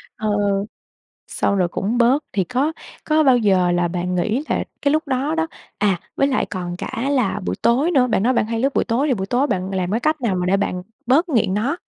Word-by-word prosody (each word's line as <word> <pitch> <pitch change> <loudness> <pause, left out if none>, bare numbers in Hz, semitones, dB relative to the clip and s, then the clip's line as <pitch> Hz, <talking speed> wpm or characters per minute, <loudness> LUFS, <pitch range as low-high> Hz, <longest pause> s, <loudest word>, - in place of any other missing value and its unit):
Ờ, 215 0 -2
ừ. 200 -1 +1 0.7
Sau 200 - +1
rồi 180 -2 +2
cũng 205 +7 -2
bớt. 255 +5 +3
Thì 195 -2 +1
có 260 - 0 0.3
có 310 0 +2
bao 260 -3 +5
giờ 190 -5 +3
là 175 0 +1
bạn 180 +1 -2
nghĩ 220 - 0
là - - 0 0.2
cái 285 0 +2
lúc 310 0 0
đó 275 +4 0
đó 325 0 0 0.3
à, 195 -4 +1 0.2
với 275 - +2
lại 270 - 0
còn 175 -3 -5
cả 235 +8 -3
là 235 -7 +1
buổi - - -1
tối 270 +9 +3
nữa, 260 -6 +3
bạn 215 -4 +1
nói 255 - +3
bạn 230 - +1
hay 225 +1 -3
lướt 270 +3 +1
buổi - - +2
tối 245 +5 0
thì 275 - +2
buổi 190 -5 -3
tối 250 +6 +1
bạn 190 -6 -2
làm 185 -1 -1
cái 225 - +1
cách 305 +2 0
nào 220 -6 0
mà 180 0 -1
để 190 +2 +2
bạn 180 -2 -2 0.2
bớt 305 +8 +3
nghiện 225 -9 +1
nó? 245 - 0
230 Hz, 245 wpm, -20 LUFS, 190-275 Hz, 0.7 s, bao